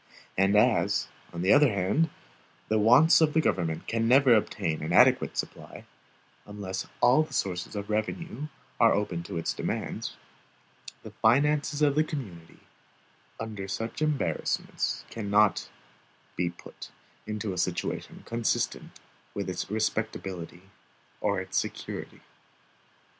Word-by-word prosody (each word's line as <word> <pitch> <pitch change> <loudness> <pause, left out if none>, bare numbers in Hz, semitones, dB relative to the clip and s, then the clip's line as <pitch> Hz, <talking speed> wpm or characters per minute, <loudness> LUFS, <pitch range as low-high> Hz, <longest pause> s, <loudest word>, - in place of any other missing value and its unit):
And 95 +2 +3
as, 105 -3 +3 0.2
on 85 0 -4
the 95 - +5
other 145 -3 +6
hand, 100 - +1 0.6
the 110 0 +2
wants 125 +11 +6
of 155 -2 +3
the - - +5
government 85 - 0
can 115 0 0
never 130 0 +6
obtain 85 -7 0
an 80 - -3
adequate - - +4
supply, - - -6 0.6
unless 100 -2 -5
all 125 +5 +6
the 155 - -4
sources 95 +1 -2
of 100 0 -4
revenue 130 - -3 0.3
are 115 -1 +6
open 95 -4 -1
to 85 - -6
its 85 - -1
demands, - - -4 0.9
the - - -9
finances 150 +1 +2
of 145 -2 +4
the 155 +2 +3
community, 100 - -8 0.8
under 105 -3 -5
such 115 +8 -4
embarrassments, 150 -2 -1
cannot 105 -1 +2 0.7
be 90 -1 0
put - - -12 0.4
into 105 -2 -3
a - - -7
situation 90 -1 -3
consistent 115 -1 -2 0.4
with 100 -2 -3
its 90 - -4
respectability 95 -5 -3 0.6
or - - 0
its - - -4
security. - - -6
105 Hz, 125 wpm, -28 LUFS, 95-135 Hz, 0.9 s, other